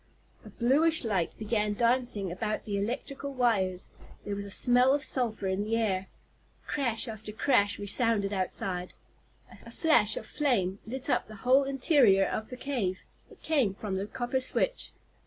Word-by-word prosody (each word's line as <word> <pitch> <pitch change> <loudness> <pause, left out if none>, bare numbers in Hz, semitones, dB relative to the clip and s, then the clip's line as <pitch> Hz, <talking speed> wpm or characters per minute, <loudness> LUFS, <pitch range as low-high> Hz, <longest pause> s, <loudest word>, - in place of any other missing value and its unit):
A - - -11
bluish 300 +7 +2
light 195 -7 -1
began 210 -1 -1
dancing 235 -5 +1
about 210 +4 -3
the 205 -2 -3
electrical 270 +6 -4
wires. 195 -7 0 0.3
There 205 - -3
was 200 0 -4
a - - -8
smell 250 +6 +4
of 290 - -1
sulphur 230 -8 0
in 190 +1 0
the 220 +2 -1
air. 195 -4 0 0.6
Crash 245 -6 -1
after 215 -1 -7
crash 210 -2 +2
resounded 205 0 +1
outside. 185 -1 -3 0.7
A - - -12
flash 235 -10 +2
of - - -5
flame 205 -10 0
lit 255 +3 -4
up - - +1
the 215 - -10
whole 265 +2 +5
interior 260 -7 +4
of 220 +3 -3
the 250 - -7
cave. 230 -10 -2 0.3
It - - -18
came 270 -11 +1
from 205 -1 -5
the 190 +2 -2
copper 245 +4 -2
switch. - - -1
220 Hz, 160 wpm, -29 LUFS, 200-255 Hz, 0.7 s, whole